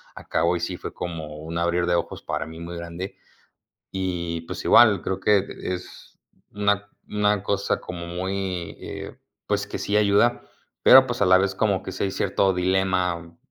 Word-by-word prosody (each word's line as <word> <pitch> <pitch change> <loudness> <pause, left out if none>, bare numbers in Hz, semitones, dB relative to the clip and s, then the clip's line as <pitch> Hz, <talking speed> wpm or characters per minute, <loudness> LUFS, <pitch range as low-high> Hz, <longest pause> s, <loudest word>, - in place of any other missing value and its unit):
a - - -10
cabo 85 +1 +2
y - - -7
sí, 90 +1 -3
fue - - -7
como 80 -3 -6
un 80 +2 -5
abrir 85 +1 +1
de 90 - +3
ojos - - -3
para - - -3
mí 80 +1 -10
muy 85 +1 -6
grande. 85 +3 -6 0.7
Y 85 -3 -2
pues - - -7
igual, 105 -7 +6
creo 95 0 -2
que 100 -1 +3 0.2
es 90 0 -7 0.3
una 100 0 0 0.2
una 105 -1 +1
cosa 100 0 0
como 85 -1 -7
muy, 95 0 -3
eh, - - -7 0.3
pues 100 -1 0
que - - -5
sí 100 - -1
ayuda, 105 +3 +3 0.4
pero 130 0 +9
pues 120 -3 -3
a - - +5
la 95 0 +7
vez 100 0 +1
como 100 -3 +1
que 95 - -6
si 95 - -3
hay 95 - -2
cierto 95 0 +1
dilema 90 -2 0
95 Hz, 180 wpm, -24 LUFS, 85-100 Hz, 0.7 s, pero